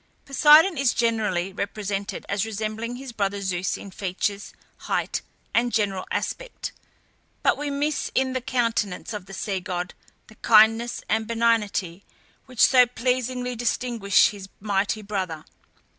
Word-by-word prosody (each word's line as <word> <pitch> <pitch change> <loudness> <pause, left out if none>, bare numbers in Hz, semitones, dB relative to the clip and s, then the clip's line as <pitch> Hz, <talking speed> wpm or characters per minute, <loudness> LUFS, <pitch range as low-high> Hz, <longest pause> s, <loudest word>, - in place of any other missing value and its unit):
Poseidon 300 +4 +6
is 275 -3 +2
generally 210 -6 0
represented 200 0 -4
as 200 -1 0
resembling 220 +2 -4
his 265 0 -8
brother 200 -2 -1
Zeus 190 -2 -2
in 200 - -10
features, 200 +1 -3 0.4
height, - - -1 0.3
and 240 +1 +2
general 200 -4 -1
aspect; - - -4 0.7
but - - +4
we 290 +1 -4
miss 285 +1 -1
in 260 0 +1
the 255 - -2
countenance 230 -5 -1
of 205 -3 -6
the 195 - -10
sea 195 -3 -2
god 180 -1 -4 0.3
the - - -16
kindness 225 +2 +4
and 220 0 0
benignity 215 -6 0 0.4
which 255 -3 -3
so 250 -2 +6
pleasingly 250 +1 -1
distinguish 235 -3 +2
his 195 -2 -9
mighty 205 +1 -1
brother. 185 -6 -4
220 Hz, 135 wpm, -24 LUFS, 200-245 Hz, 0.7 s, Poseidon